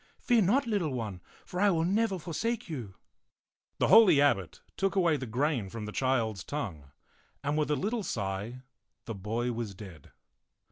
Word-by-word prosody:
Fear 240 -3 +3
not, 245 +9 +3
little 200 - 0
one, 105 -7 -4 0.2
for 180 - -5
I 205 +1 +5
will 165 -3 +2
never 200 +1 +1
forsake 220 +8 -3
you.* 120 - -6 0.4
" - - -59
The - - +2
holy 195 -8 +8
abbot 100 - +1
took 195 0 0
away 175 -5 +3
the 130 -3 -4
grain 125 -3 0
from 110 +1 -6
the 105 - -5
child's 115 -7 0
tongue, 90 - -5 0.5
and 145 +1 0
with 150 -1 0
a 150 - +2
little 215 +8 -1
sigh 105 - -4 0.4
the 115 - -4
boy 110 +5 -2
was 115 -4 -4
dead. 90 -8 -11
140 Hz, 175 wpm, -30 LUFS, -, 0.5 s, holy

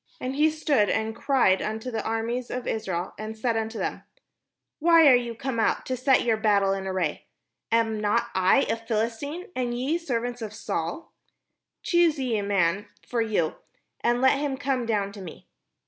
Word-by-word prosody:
And 255 +1 -3
he 305 +2 +4
stood 295 -9 +1
and 220 0 -1
cried 245 -8 +2
unto 220 +4 -4
the 220 -2 -3
armies 230 +2 -2
of 250 0 -4
Israel, 185 -4 -3
and 215 +1 -6
said 230 +1 0
unto 225 0 -2
them: - - -3 0.8
"Why 330 0 +6
are 270 - +8
ye 240 -1 -1
come 235 0 -3
out 220 - +1
to 255 - -2
set 255 +1 +3
your 230 -2 +2
battle 200 -3 +2
in 195 0 -4
array? 185 -5 -2 0.4
am 225 -1 +2
not 210 0 +1
I 190 +8 +4
a 225 - -1
Philistine, 230 - -3
and 245 -1 -1
ye 285 +7 0
servants 245 -6 -3
to 220 -2 -5
Saul? 205 - -4 0.7
choose 345 -3 +3
you 250 -5 -1
a - - -1
man 200 0 +1 0.2
for 240 -2 0
you, 210 -8 0 0.4
and 240 +1 +1
let 265 +1 +4
him 285 -2 -2
come 260 -3 -1
down 205 -3 0
to 200 -1 -10
me. 175 -4 -10
230 Hz, 180 wpm, -26 LUFS, 210-260 Hz, 0.8 s, are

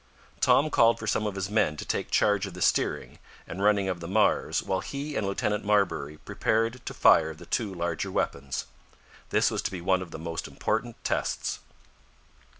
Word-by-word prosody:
Tom 155 +2 +4
called 115 -2 +5
for 115 - -7
some 110 0 0
of 100 - -4
his 95 0 -2
men 75 -8 +2
to - - -6
take - - -2
charge 105 -1 +2
of 90 - -9
the 90 - -8
steering - - 0 0.3
and 95 - -6
running 100 -1 +3
of 90 -2 -2
the 85 - -7
Mars 105 +3 +2
while 95 -1 -1
he 145 +1 -5
and 100 - -1
Lieutenant 105 +1 -1
Marbury 95 -8 +1
prepared 115 +8 -1
to - - -4
fire 80 -1 +5
the - - -13
two 110 -4 -1
larger 85 -3 -2
weapons. 70 -1 -2 0.6
This - - +3
was - - -1
to - - -2
be 95 - -5
one 95 +1 +1
of 90 - -7
the - - -7
most 80 0 -5
important 115 +1 -2
tests. - - -1
100 Hz, 190 wpm, -27 LUFS, 85-110 Hz, 0.6 s, called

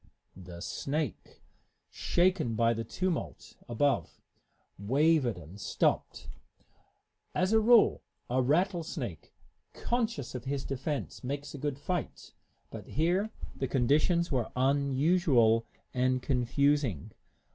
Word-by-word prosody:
The 90 -2 -10
snake, 140 - -4 0.5
shaken 175 -9 +1
by 115 +1 +3
the 115 0 -3
tumult 180 - -4
above, 140 +4 0 0.6
wavered 135 - +2
and 90 +4 -11
stopped. - - -1 1.1
As 185 +3 +1
a 220 - +6
rule, 230 +1 +5 0.3
a 130 +2 +1
rattlesnake, 160 - -1 0.4
conscious 230 - -2
of 125 -1 -6
his 140 0 -3
defense, 135 +2 -4
makes 140 +3 -4
a 145 - -7
good 145 -1 -2
fight; 175 +5 -4 0.4
but - - -9
here 180 +7 +1 0.3
the 135 - -2
conditions 150 +7 +2
were 125 -5 -1
unusual 135 -3 +3 0.3
and 130 0 +1
confusing. 135 - 0
140 Hz, 105 wpm, -30 LUFS, 120-165 Hz, 1.1 s, a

